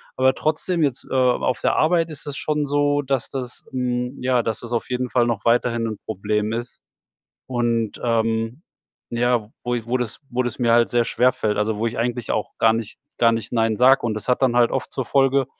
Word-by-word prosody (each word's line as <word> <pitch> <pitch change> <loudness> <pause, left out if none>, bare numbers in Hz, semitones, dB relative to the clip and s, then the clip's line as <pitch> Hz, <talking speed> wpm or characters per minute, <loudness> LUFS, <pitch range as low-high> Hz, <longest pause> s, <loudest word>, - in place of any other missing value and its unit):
aber 130 0 +3
trotzdem 160 +2 0
jetzt, 135 -4 -1
äh, - - -5
auf 125 -1 +2
der - - +2
Arbeit 165 +1 +2
ist 155 -1 -5
das 145 -1 -5
schon 150 -1 -1
so, 145 0 +1
dass 135 -3 -1
das, 125 -2 -5
hm 125 0 -2
ja, 125 -1 +2
dass 110 -1 -2
das 120 0 -7
auf 120 - -2
jeden 125 0 -2
Fall 120 -1 +2
noch 115 -4 -2
weiterhin 115 -1 +2
'n 110 -2 -4
Problem 105 +2 -1
ist. 120 +2 -6 0.6
Und, 120 -3 -1
ähm, 115 +3 0 0.5
ja, 120 -2 0
wo 120 0 -1
i 115 -2 -4
wo 125 +2 0
das 125 -3 -4
wo 125 +1 0
das 120 -3 -3
mir 120 -2 +2
halt 120 0 +4
sehr 120 -1 +2
schwerfällt, 125 -4 +1
also 105 0 0
wo 115 - -1
ich 115 - -4
eigentlich 120 0 -2
auch 110 - -3
gar 110 0 +4
nicht 115 +2 -4 0.2
gar 115 -1 +5
nicht 115 -1 -3
„nein“ 115 -2 +1
sag. 130 +4 +5
Und 110 -2 -1
das 110 - -5
hat 125 +1 +1
dann 125 -2 +3
halt 120 -1 +4
oft - - -3
zur 130 - -3
Folge, 135 -1 +3
120 Hz, 220 wpm, -22 LUFS, 115-130 Hz, 0.6 s, gar